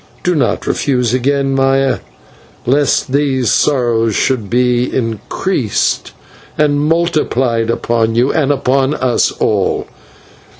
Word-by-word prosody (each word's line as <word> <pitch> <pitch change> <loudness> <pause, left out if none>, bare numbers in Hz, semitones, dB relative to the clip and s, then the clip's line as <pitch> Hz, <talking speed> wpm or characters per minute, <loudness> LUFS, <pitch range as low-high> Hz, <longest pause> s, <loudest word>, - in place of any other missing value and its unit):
Do 180 - +1
not 140 -7 0
refuse 125 -4 0
me 130 - +2
again, 135 +1 0
Maya, 135 0 +1 0.7
lest 135 0 +1
these 135 -4 +1
sorrows 115 -6 +1
should 115 -7 0
be 125 0 +1
increased 115 - -2 0.5
and 145 -1 +2
multiplied 150 -8 0
upon 115 -1 0
you, 125 +3 +2
and 145 -3 +1
upon 135 +1 +1
us 125 -2 +1
all. 100 -3 0
130 Hz, 115 wpm, -15 LUFS, 120-140 Hz, 0.7 s, me